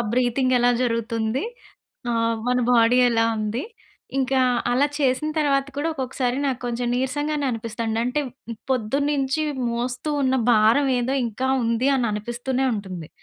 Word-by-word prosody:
Breathing 255 +1 +1
ఎలా 245 0 +4
జరుగుతుంది? 230 0 -1 0.7
ఆహ్, 230 0 +1
మన 250 0 +2
బోడీ 240 +1 +5
ఎలా 225 -1 +2
ఉంది? 215 +5 -2 0.6
ఇంకా 265 0 +1 0.3
అలా 265 +4 +3
చేసిన 270 +2 +1
తర్వాత 275 -2 +2
కూడా, 305 +3 -1
ఒకొక్కసారి 255 -2 -2
నాకు 260 -2 -2
కొంచెం 240 0 -2
నీరసంగానే 290 +3 -1
అనిపిస్తదండి. 225 -1 -3
అంటే, 265 +5 0 0.5
పొద్దున్నించీ 275 +4 0 0.3
మోస్తూ 245 +5 -2
ఉన్న 260 0 +2 0.2
భారవేదో 245 +3 +3
ఇంకా 255 +4 -3 0.2
ఉంది, 230 +4 +1
అని 250 -3 +1
అనిపిస్తూనే 240 +5 -2
ఉంటుంది. 185 -6 -6
250 Hz, 125 wpm, -23 LUFS, 230-270 Hz, 0.7 s, బోడీ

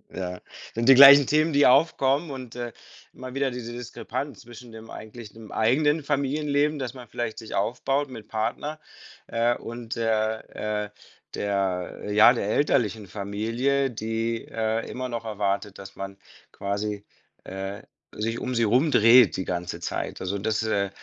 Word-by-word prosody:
Ja, 90 -1 -4 0.3
sind 115 +2 -2
die 135 - +10
gleichen 140 +1 +10
Themen, 155 +2 +2
die 145 -1 +4
aufkommen 140 +2 +3
und, 130 -3 -8
äh, 120 -1 -5 0.4
immer 130 0 -9
wieder 135 -1 0
diese 120 -1 -6
Diskrepanz 125 +3 -6
zwischen 120 0 -13
dem 110 0 -11
eigentlichen 110 0 -10
dem 110 -1 -12
eigenen 145 +7 +2
Familienleben, 145 +1 0
das 130 -2 -4
man 125 -3 -12
vielleicht 120 -2 -4
sich 110 - -7
aufbaut 135 +7 0
mit 115 -4 -10
Partner, 145 +8 -3 0.5
äh, 120 +1 +1
und 115 0 -7
der 110 -1 -1
äh, 105 -1 -3 0.5
der 95 -3 -2
ja, 110 +3 +7
der 120 -5 -2
elterlichen 110 -4 +1
Familie, 115 +8 -1
die, 115 0 -3
äh, 110 0 -2
immer 130 0 -4
noch 115 -1 -5
erwartet, 100 -2 -2
dass 95 0 -11
man 95 0 -6 0.4
quasi, 100 +1 -3 0.4
äh, 95 +1 -6 0.3
sich 115 +2 -3
um 125 -1 -3
sie 115 - +2
rum 125 +8 +3
dreht 115 -1 +6
die 95 - -3
ganze 90 -1 -4
Zeit. - - -4
Also 95 +2 -2
das 110 +2 -1
ist 110 - -2
äh, 100 -2 0
115 Hz, 160 wpm, -25 LUFS, 105-130 Hz, 0.5 s, die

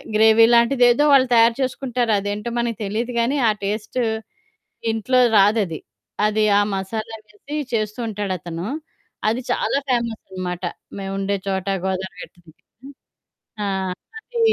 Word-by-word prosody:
Gravy 220 +1 +6
లాంటిదేదో 245 +3 +5
వాళ్ళు 260 -2 +6
తయారు 230 0 +5
చేసుకుంటారు. 250 -2 -1
అదేంటో 205 +3 -3
మనకు 235 -2 -1
తెలీదు 230 +5 -2
కానీ 260 +5 +1
ఆ - - +5
టేస్టు 215 +4 -2 0.9
ఇంట్లో 250 +3 +2 0.2
రాదది. 200 -5 +3 0.5
అది 215 0 +1
ఆ - - +5
మసాలా 220 +4 -4
వేసి 245 +8 -8 0.2
చేస్తూ 215 +1 -1
ఉంటాడతను. 185 -4 -4 0.6
అది 230 +4 0
చాలా 275 - +1
ఫేమసనమాట, 190 -7 -3 0.3
మేముండే 195 +1 -2
చోట 190 -1 -2 0.2
గోదావరి 190 -1 -4
గట్టు - - -13
దగ్గర. 250 - -16 0.7
ఆ! - - -1 0.5
అది 475 +1 -7
220 Hz, 120 wpm, -21 LUFS, 195-240 Hz, 0.9 s, Gravy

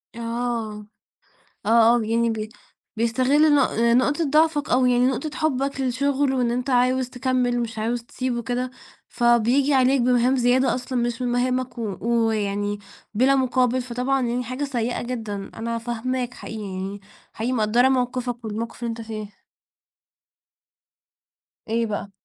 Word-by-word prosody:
آه، 230 -3 -3 0.8
آه، 230 +1 +5
آه - - +1
يعني 230 +1 +1
ب 215 -1 -3 0.5
بيستغل 260 +7 +3
نق 280 -3 +3
نقطة 250 +7 +2
ضعفك 305 -1 +2
أو 250 0 +4
يعني 245 0 +3
نقطة 265 +4 -1
حبك 275 -3 -1
للشغل 270 +2 +1
وإن 245 -2 +1
أنت 250 +3 -2
عاوز 255 0 +2
تكمّل 250 -1 0
مش 225 -2 -4
عاوز 235 +2 -1
تسيبُه 255 0 -3
وكده، 245 +1 -2 0.4
فبييجي 240 +4 +3
عليك 265 +1 +4
بمهام 250 +1 +3
زيادة 250 0 +3
أصلًا 255 0 -3
مش 240 +1 -2
من 245 - 0
مهامك 250 0 -1
و 205 -5 -3 0.3
ويعني 205 -1 -1 0.4
بلا 260 +5 +4
مقابل، 255 -1 +1
فطبعًا 250 +2 -1
يعني 245 +1 -1
حاجة 255 +4 -3
سيئة 245 -3 -2
جدًا. 220 -5 -5
أنا 230 +1 -3
فاهماك 245 +2 -3
حقيقي 220 -1 -7
يعني، 195 +1 -5 0.3
حقيقي 235 +3 -2
مقدّرة 235 +2 +3
موقفك 245 -2 -1
والموقف 225 +2 -5
اللي 235 - -1
أنت 230 - -6
فيه. 215 -3 -8 2.2
إيه 230 +1 0
بقى؟ 205 -2 -4
245 Hz, 140 wpm, -23 LUFS, 230-255 Hz, 2.2 s, آه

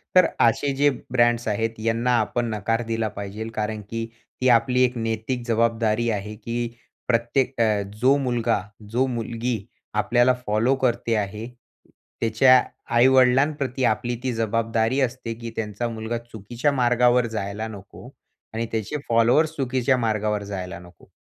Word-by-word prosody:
तर 185 -1 +8 0.2
असे 120 +5 +3
जे 145 +2 +4 0.2
ब्रँड्स 120 -2 +2
आहेत 110 +1 -1
यांना 115 +2 0
आपण 120 +2 -1
नकार 115 +3 -1
दिला 115 -1 -1
पाहिजे. 100 +2 -6
कारण 110 0 -2
की 115 0 -3 0.4
ती 130 - +2
आपली 125 +2 +3
एक 125 -1 +1
नैतिक 115 +2 -2
जवाब 115 0 +3
जबाबदारी 115 0 0
आहे, 105 0 -3
की 115 +2 -3 0.4
प्रत्येक 125 +2 +1
अ, 105 -2 +2 0.2
जो 135 +3 +5
मुलगा, 120 -5 0 0.3
जो 125 +4 +1
मुलगी 115 +1 -2 0.4
आपल्याला 120 +3 +3
फॉलो 110 +6 +2
करते 120 -2 +1
आहे, 105 +3 -7 0.7
त्याच्या 125 +3 +5 0.3
आई-वडिलां 130 +3 +5
प्रती 130 -1 -2
आपली 120 +3 -2
ती 130 - 0
जबाबदारी 115 +2 0
असते, 125 -2 -2
की 115 0 -7
त्यांचा 110 +2 -3
मुलगा 115 +1 -4
चुकीच्या 120 +4 -3
मार्गावर 125 -1 +3
जायला 105 +2 -3
नको 100 -3 -11 0.4
आणि 115 +1 -2
त्याचे 110 +6 -2
फॉलोवर्स 120 +8 +3
चुकीच्या 130 -1 +1
मार्गावर 110 -3 0
जायला 95 -3 -6
नको. 90 0 -17
115 Hz, 145 wpm, -23 LUFS, 110-125 Hz, 0.7 s, तर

